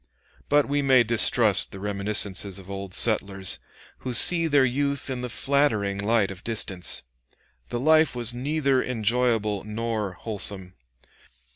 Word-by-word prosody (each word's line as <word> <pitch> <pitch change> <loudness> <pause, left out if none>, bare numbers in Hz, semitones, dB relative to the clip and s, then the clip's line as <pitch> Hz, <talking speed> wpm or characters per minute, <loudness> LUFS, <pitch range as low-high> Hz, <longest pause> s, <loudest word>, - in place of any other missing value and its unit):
But 145 0 +3
we 145 +1 0
may 130 -3 +4
distrust 115 -2 +3
the 95 - -9
reminiscences 100 -1 -1
of 95 0 -10
old 95 -1 -6
settlers, 100 -4 +2 0.4
who 125 -2 -5
see 165 +6 +4
their 145 -3 +3
youth 140 +1 -2
in 125 -1 -4
the 125 - -5
flattering 110 -7 0
light 105 -1 +1
of 95 -1 -11
distance. 100 -5 -2 0.7
The 120 - -3
life 155 +1 +3
was 120 -1 0
neither 140 +1 0
enjoyable 115 -3 -1
nor 110 -2 -4
wholesome. 100 -3 -3
115 Hz, 135 wpm, -24 LUFS, 100-130 Hz, 0.7 s, may